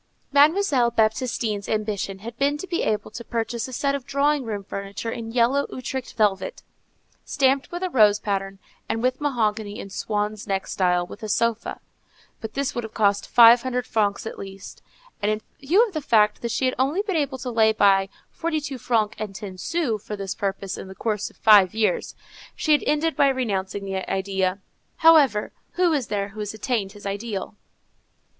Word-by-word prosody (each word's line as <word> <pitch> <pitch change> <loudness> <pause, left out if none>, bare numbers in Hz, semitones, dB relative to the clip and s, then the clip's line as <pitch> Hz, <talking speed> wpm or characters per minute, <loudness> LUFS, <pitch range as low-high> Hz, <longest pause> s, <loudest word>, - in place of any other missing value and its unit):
Mademoiselle 290 -3 +4
Baptistine's 220 -2 0
ambition 210 -3 -2
had 235 -1 -6
been 285 +1 +2
to 315 - -6
be 355 -2 -2
able 215 0 -1
to 235 - -7
purchase 230 +1 -3
a - - -9
set 275 +2 0
of 280 -2 -3
drawing 280 +2 +1
room 210 -4 -4
furniture 200 +3 -5
in 225 -1 -6
yellow 250 +4 +2
Utrecht 255 0 -5
velvet, 210 - 0 0.6
stamped 270 0 +1
with 350 +1 -4
a 370 - 0
rose 210 -6 +5
pattern, 195 -2 -3 0.3
and 225 - -1
with 255 +2 0
mahogany 220 -7 -1
in 195 - -8
swan's 210 +1 -3
neck 195 -1 -1
style, 180 -2 +1
with 205 - -11
a 215 - -5
sofa. 230 +1 0 0.6
But 220 -2 -7
this 275 -1 -1
would 240 - -3
have 220 - -9
cost 205 -2 +1
five 235 0 +8
hundred 250 -1 -2
francs 205 -4 0
at - - -6
least, 195 0 -9 0.4
and 205 - +1
in 215 0 -2 0.2
view 360 - +4
of 425 - -9
the 310 - -2
fact 210 -5 +3
that 235 - -2
she 230 +3 0
had 255 - +1
only 290 +10 +1
been 395 -4 -2
able 285 -4 0
to 250 0 -5
lay 220 -1 +4
by 195 -2 +3 0.2
forty 325 -1 -2
two 280 -3 -6
francs 220 -3 0
and 210 -3 -5
ten 190 -3 -8
sous 255 - -1
for 210 - -5
this 195 -1 -4
purpose 195 -1 -3
in - - -8
the 190 - -10
course 210 -1 -2
of - - -23
five 205 -3 +6
years, 215 -4 0 0.4
she 310 - -1
had 295 - +5
ended 310 +2 +1
by 280 - +4
renouncing 200 -7 -1
the 190 -1 -4
idea. 190 -1 0 0.4
However, 300 -10 +5 0.2
who 355 -2 +2
is 275 -6 -1
there 200 -1 -2
who 215 +2 -11
has 210 0 -4
attained 215 -3 -2
his 205 -1 -13
ideal? 200 0 -4
225 Hz, 190 wpm, -24 LUFS, 205-265 Hz, 0.6 s, five